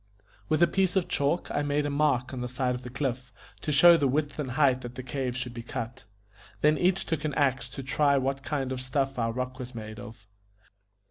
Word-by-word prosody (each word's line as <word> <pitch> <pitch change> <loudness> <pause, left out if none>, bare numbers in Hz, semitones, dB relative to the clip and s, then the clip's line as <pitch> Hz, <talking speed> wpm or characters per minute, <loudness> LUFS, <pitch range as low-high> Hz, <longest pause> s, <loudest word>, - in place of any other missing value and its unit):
With 155 +2 +3
a - - +6
piece 190 -1 +1
of 190 -2 +2
chalk 145 +5 0
I - - 0
made 145 0 0
a 145 - -1
mark 140 -3 +1
on 125 - -4
the 125 - -2
side 125 0 -1
of 125 - -5
the 125 - -8
cliff, 125 -1 -3 0.3
to 150 - -2
show 170 +4 +8
the 145 -3 +2
width 145 +2 -1
and 140 -3 -2
height 130 -2 +3
that 120 0 -8
the 130 - -6
cave 130 -1 -3
should 125 -1 -4
be 120 - -6
cut. 120 +2 -6 0.6
Then 150 +1 +5
each 180 +3 +1
took 160 -2 -2
an 150 -3 -2
axe 135 -3 +1
to 135 - -7
try 140 +2 +2
what 135 +1 -1
kind 135 -2 -2
of 130 -1 -3
stuff 135 0 -1
our 115 -1 +1
rock 125 +2 -4
was 125 -1 -7
made 110 -1 -7
of. 110 -3 -11
135 Hz, 230 wpm, -28 LUFS, 125-145 Hz, 0.6 s, show